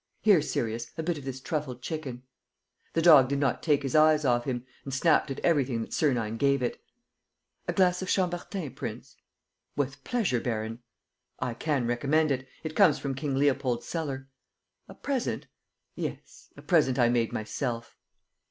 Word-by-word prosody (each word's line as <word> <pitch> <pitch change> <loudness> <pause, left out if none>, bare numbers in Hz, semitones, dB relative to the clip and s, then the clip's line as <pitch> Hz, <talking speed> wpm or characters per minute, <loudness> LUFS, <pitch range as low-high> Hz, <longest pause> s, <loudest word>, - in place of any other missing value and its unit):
Here, 200 -7 +6
Sirius, 115 -4 -2
a 160 - -2
bit 165 -2 -1
of 135 - -11
this 130 -1 -5
truffled 130 -2 -4
chicken!" 140 -6 -5 0.7
The 165 - +1
dog 150 -7 +8
did 140 - 0
not 140 -3 0
take 145 -3 +2
his 135 0 -2
eyes 155 -1 +5
off 120 -2 +2
him, 125 -2 -3 0.2
and 135 - -6
snapped 150 +3 +3
at 135 - -4
everything 140 -8 +2
that - - -6
Sernine 115 -7 +1
gave 140 0 +2
it. 120 - -2 0.9
"A - - 0
glass 180 -1 +3
of 185 - -4
Chambertin, 180 -4 -1
prince?" - - -7 0.6
"With 140 0 -2
pleasure, 195 - 0
baron." 115 -1 -3 0.6
"I 125 -2 -2
can 140 0 -1
recommend 140 +6 +2
it. 130 0 -2 0.2
It 160 -1 -5
comes 150 - +5
from 140 -1 -3
King 140 0 -2
Leopold's 135 -3 +1
cellar." 140 -5 -4 0.6
"A - - -12
present?" 270 -4 -2 0.5
"Yes, - - -7
a - - -12
present 150 -8 +3
I 120 -2 +5
made 120 -2 +1
myself." 115 +2 -4
140 Hz, 165 wpm, -28 LUFS, 125-155 Hz, 0.9 s, dog